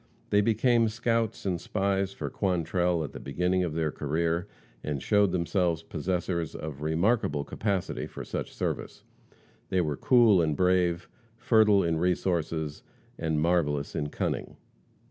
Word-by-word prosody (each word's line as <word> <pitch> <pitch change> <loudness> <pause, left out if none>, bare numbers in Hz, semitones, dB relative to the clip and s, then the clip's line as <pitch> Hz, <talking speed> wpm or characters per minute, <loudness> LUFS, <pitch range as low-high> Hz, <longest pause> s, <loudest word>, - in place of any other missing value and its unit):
They 105 - +5
became 115 +2 +3
scouts 115 -1 -1
and 90 -3 -1
spies 100 -1 0
for - - -5
Quantrell 90 -2 0
at 75 - -7
the - - -7
beginning 90 +6 0
of 80 -3 -3
their 80 -2 0
career, 80 +5 -1 0.4
and 75 -2 -2
showed 105 - +3
themselves 85 -1 0
possessors 85 0 -2
of 75 -2 -6
remarkable 80 0 +1
capacity 100 +2 -2
for - - -8
such - - -4
service. - - -4 0.7
They 95 - +1
were 75 -4 -2
cool 115 -7 +5
and 75 -3 0
brave, 90 -2 +2 0.3
fertile 110 -5 +4
in 85 -1 0
resources, 85 -3 -1 0.4
and 80 -1 0
marvelous 75 -4 +1
in 75 -1 -2
cunning. - - -3
90 Hz, 140 wpm, -28 LUFS, 80-100 Hz, 0.7 s, They